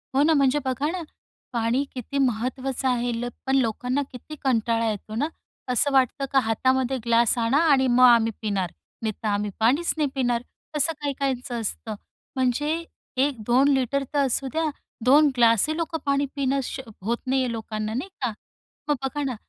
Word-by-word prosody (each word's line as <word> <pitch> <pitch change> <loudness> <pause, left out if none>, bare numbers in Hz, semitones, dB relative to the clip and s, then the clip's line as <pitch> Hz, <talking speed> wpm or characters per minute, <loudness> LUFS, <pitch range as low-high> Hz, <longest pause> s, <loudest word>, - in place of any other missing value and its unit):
हो 275 - +4
ना, 320 - +4
म्हणजे 280 -1 +3
बघा 265 +4 0
ना, 360 -1 -4 0.5
पाणी 235 +3 +1
किती 260 +2 -5
महत्त्वाचं 255 +1 0
आहे. 245 -1 +1
ल 235 +1 -3 0.2
पण 265 - +1
लोकांना 250 +3 0
किती 260 +4 -9
कंटाळा 230 -3 +1
येतो 215 +1 -5
ना, 285 +6 +1 0.4
असं 250 +4 +3
वाटतं 265 +1 +2
का 270 - +5
हातामध्ये 260 +3 +1
ग्लास 235 0 +3
आणा 235 +4 +2
आणि 265 -2 +4
मग 250 +1 +4
आम्ही 230 -2 +5
पिणार. 195 -5 -1 0.3
नाहीतर 220 0 -3
आम्ही 205 0 0
पाणीच 275 +10 +2
नाही 295 -3 +1
पिणार, 245 -3 +1 0.3
तसं 300 +2 +2
काही 285 -1 -1
काहींचं 255 -3 -2
असतं. 215 0 -3 0.4
म्हणजे 295 +6 0 0.4
1-2 255 0 +2
लिटर 270 +1 +1
तर 290 - +2
असू 270 +1 0
द्या. 320 0 0 0.4
2 290 +4 +6
ग्लासही 235 +6 +4
लोकं 335 0 -2
पाणी 280 0 +2
पिणं 275 -1 +1
श 255 - -5 0.2
होत 230 +5 -1
नाहीये 260 -2 +1
लोकांना 220 -1 -4
नाही 275 +11 -3
का? 250 -3 0 0.6
मग 295 - +4
बघा 290 +2 -2
ना, 260 -3 -2
255 Hz, 170 wpm, -25 LUFS, 230-280 Hz, 0.6 s, 2